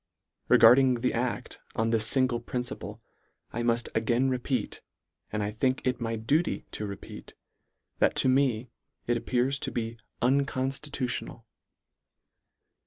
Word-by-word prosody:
Regarding 130 +2 +7
the 125 - +2
acT: 120 +1 -3 0.2
on 115 0 +1
this 110 +1 +2
lingle 130 -3 +2
principle, 125 +1 -5 0.5
I 120 - -2
mull: 120 0 +2 0.2
again 120 +4 +2
repeat, 125 -2 -2 0.5
and 105 -1 -1
I 105 - -2
think 130 +5 0
it 125 -1 0
my 115 0 -1
duty 140 +10 0
to 105 - -4
repeat, 100 -1 -9 0.6
that - - +3
to - - +2
me 130 -3 +2 0.3
it 120 - +1
appears 125 +3 0
to - - -2
be 115 -1 -4 0.2
unconstitutional. 135 0 -1
125 Hz, 125 wpm, -28 LUFS, 115-130 Hz, 0.6 s, Regarding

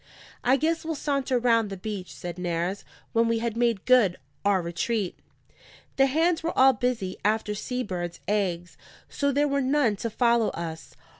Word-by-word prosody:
"I 260 +2 +4
guess 325 +3 0
we'll 320 0 -3
saunter 275 -3 0
round 230 -3 +2
the 195 - -6
beach," 195 -1 -6
said 175 0 -7
Nares, 175 +2 -2 0.3
when 230 0 +3
we 230 0 +1
had 230 -1 -2
made 235 -4 +1
good 240 -8 +4 0.3
our 200 -1 +3
retreat. 185 +4 -2 0.8
The 270 0 +5
hands 325 +4 +2
were 330 +1 -3
all 265 0 +7
busy 230 -5 -2
after 215 0 +1
sea 250 +4 -3
birds' 175 -4 -5
eggs, 180 -4 -1 0.3
so 280 0 0
there 290 +2 +2
were 280 0 +1
none 260 -5 +2
to 230 - -3
follow 235 0 +2
us. 165 -1 -6
230 Hz, 170 wpm, -26 LUFS, 190-260 Hz, 0.8 s, all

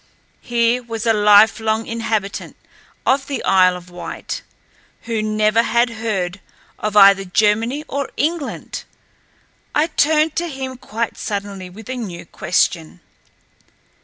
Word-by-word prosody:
Here 235 +1 +1
was 230 -2 -5
a 225 - +4
lifelong 220 +1 +4
inhabitant 220 -3 -3 0.5
of 270 +1 +2
the 280 - -3
Isle 185 -1 +4
of 180 0 -14
Wight 175 0 -6 0.6
who 230 -2 -2
never 215 +1 +2
had 235 +1 +1
heard 205 -5 -3 0.4
of 210 0 -1
either 195 -1 +7
Germany 220 +9 +1
or 280 0 -3
England! 315 -2 -2 0.9
I 300 - +4
turned 310 -1 +2
to 345 +1 0
him 265 -3 -5
quite 230 -1 -4
suddenly 200 -3 -4
with 200 +4 -12
a 255 - -4
new 190 -8 -6
question. 80 +2 -1
220 Hz, 125 wpm, -19 LUFS, 200-250 Hz, 0.9 s, either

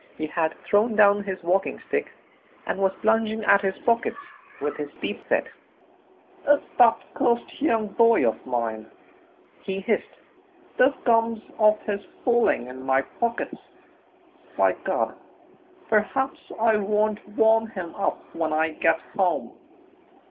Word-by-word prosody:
He 155 - -2
had 160 +1 -1
thrown 215 +2 +2
down 205 -1 +5
his 190 -2 -5
walking 185 +3 0
stick 450 0 -2 0.5
and - - -3
was 195 -1 +2
plunging 220 0 +1
at 200 -1 +5
his 195 -1 -2
pockets 235 0 +1 0.4
with - - -2
his - - -5
teeth - - -4
set. - - +2 1.0
"It's 290 0 +4 0.2
that 235 -2 +7 0.2
cursed 235 +1 -1
young 225 -7 +2
boy 230 - +4
of 110 - -2
mine," 115 -3 -3 0.7
he 190 0 -4
hissed; 210 +2 -2 0.6
"this 270 +2 +4
comes 230 -1 +3 0.2
of 215 0 +5
his 205 -2 -3 0.2
fooling 240 - +2
in 130 +1 -9
my 135 +1 +2
pockets. 235 - -3 1.0
By - - +4
Gad! - - -1 0.7
perhaps 225 +5 -1
I 225 -1 +4
won't 210 +1 0 0.2
warm 225 0 +4
him 185 -6 -7
up 200 - -2
when 160 -2 -1
I 160 +1 +2
get - - +1 0.2
home. - - 0
210 Hz, 135 wpm, -24 LUFS, 180-230 Hz, 1.0 s, that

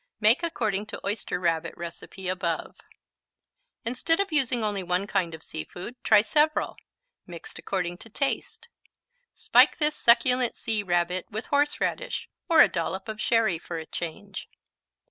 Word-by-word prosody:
Make 220 +6 +4
according 215 - -1
to - - -8
Oyster 200 -3 -2
Rabbit 165 -2 -1
recipe 175 +2 -7
above. 180 -3 -2 1.1
Instead 255 +8 +1
of 400 -2 0
using 260 -6 +2
only 205 -2 -1
one 180 +2 -1
kind 185 -5 -1
of 160 - -14
sea 155 - -5
food, 185 +8 -9
try - - +6
several, 305 +6 +1 0.5
mixed 170 -2 -10
according 175 -2 -3
to 225 - -12
taste. 275 - -2 0.7
Spike - - +5
this 300 0 +1
succulent 250 +1 +4
Sea 220 -2 +1
Rabbit 180 -1 0
with 220 +3 -5
horseradish 295 +12 -1 0.2
or 325 -1 +7
a - - +4
dollop 190 +3 -3
of 215 -1 -5
sherry, 220 -8 +2
for 170 0 -6
a 160 - -6
change. 190 +5 -7
205 Hz, 145 wpm, -26 LUFS, 175-250 Hz, 1.1 s, or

